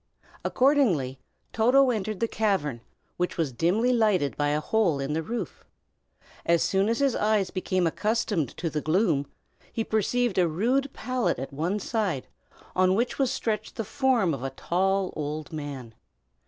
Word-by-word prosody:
Accordingly 205 Hz, -, +2 dB, 0.3 s
Toto 255 Hz, +4 st, +4 dB
entered 215 Hz, -3 st, -3 dB
the 230 Hz, -, +2 dB
cavern, 175 Hz, -, 0 dB, 0.4 s
which 180 Hz, 0 st, -1 dB
was 160 Hz, -5 st, 0 dB
dimly 195 Hz, -, +2 dB
lighted 210 Hz, -, +2 dB
by 145 Hz, -, 0 dB
a 150 Hz, +1 st, +1 dB
hole 175 Hz, -3 st, +1 dB
in 135 Hz, +2 st, -2 dB
the 160 Hz, -, 0 dB
roof. 220 Hz, 0 st, -5 dB, 0.8 s
As 170 Hz, 0 st, +3 dB
soon 195 Hz, +2 st, +2 dB
as 230 Hz, -, +1 dB
his 275 Hz, -1 st, +2 dB
eyes 210 Hz, -3 st, +1 dB
became 185 Hz, -1 st, 0 dB
accustomed 210 Hz, -, -1 dB
to 165 Hz, -2 st, -2 dB
the 150 Hz, -, -2 dB
gloom, 155 Hz, -4 st, +1 dB, 0.4 s
he 225 Hz, -, -1 dB
perceived 220 Hz, 0 st, +1 dB
a 175 Hz, -, +4 dB
rude 250 Hz, -, 0 dB
pallet 255 Hz, +1 st, -1 dB
at 135 Hz, +2 st, -6 dB
one 170 Hz, +8 st, -1 dB
side, 200 Hz, -, -2 dB, 0.5 s
on 185 Hz, 0 st, +4 dB
which 240 Hz, +6 st, -1 dB
was 270 Hz, -2 st, +3 dB
stretched 220 Hz, -3 st, -2 dB
the 225 Hz, -, -3 dB
form 250 Hz, -, +2 dB
of 135 Hz, -, -5 dB
a 135 Hz, -, -1 dB
tall 190 Hz, +7 st, 0 dB
old 150 Hz, +1 st, -4 dB
man. 140 Hz, -6 st, -6 dB
190 Hz, 160 wpm, -27 LUFS, 155-225 Hz, 0.8 s, Toto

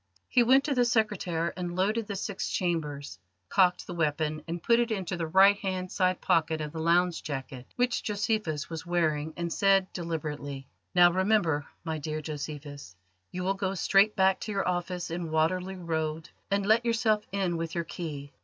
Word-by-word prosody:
He 250 Hz, -, +4 dB
went 260 Hz, +3 st, +5 dB
to 290 Hz, -, 0 dB
the 250 Hz, -2 st, +3 dB
secretaire 205 Hz, -8 st, 0 dB
and 175 Hz, -1 st, -4 dB
loaded 210 Hz, +4 st, 0 dB
the 200 Hz, -, -4 dB
six 195 Hz, 0 st, -3 dB
chambers, 150 Hz, -6 st, -2 dB, 0.3 s
cocked 180 Hz, -1 st, +3 dB
the -, -, -6 dB
weapon 155 Hz, -1 st, -1 dB
and 170 Hz, 0 st, -5 dB
put 235 Hz, 0 st, +4 dB
it 240 Hz, 0 st, +1 dB
into 190 Hz, -4 st, -2 dB
the 165 Hz, -2 st, -3 dB
right 195 Hz, +4 st, +6 dB
hand 185 Hz, -2 st, -3 dB
side 185 Hz, -1 st, +1 dB
pocket 160 Hz, -1 st, +2 dB
of 150 Hz, -1 st, -4 dB
the 160 Hz, -, -6 dB
lounge 170 Hz, +1 st, +2 dB
jacket 135 Hz, -3 st, -6 dB
which 245 Hz, 0 st, +1 dB
Josephus 205 Hz, -7 st, -1 dB
was 165 Hz, -1 st, -6 dB
wearing, 160 Hz, -3 st, 0 dB
and 170 Hz, -1 st, -2 dB
said 195 Hz, -1 st, +3 dB
deliberately: 150 Hz, -5 st, -5 dB, 0.3 s
"Now 175 Hz, -1 st, +7 dB
remember, 185 Hz, -6 st, +1 dB, 0.2 s
my 160 Hz, -2 st, -3 dB
dear 155 Hz, +1 st, -3 dB
Josephus: 145 Hz, -, -7 dB, 0.3 s
you 180 Hz, 0 st, -5 dB
will 190 Hz, +1 st, +1 dB
go 195 Hz, 0 st, -2 dB
straight 195 Hz, +3 st, +4 dB
back 190 Hz, 0 st, +3 dB
to 215 Hz, -, -5 dB
your 200 Hz, -2 st, -1 dB
office 180 Hz, -1 st, -2 dB
in 170 Hz, -1 st, -3 dB
Waterloo 180 Hz, +4 st, 0 dB
Road 160 Hz, -1 st, -2 dB, 0.2 s
and 200 Hz, 0 st, +1 dB
let 220 Hz, +3 st, +4 dB
yourself 225 Hz, -2 st, +1 dB
in 190 Hz, -3 st, 0 dB
with 165 Hz, 0 st, -4 dB
your 170 Hz, -, 0 dB
key. 150 Hz, -4 st, -7 dB
175 Hz, 180 wpm, -28 LUFS, 155-195 Hz, 0.3 s, Now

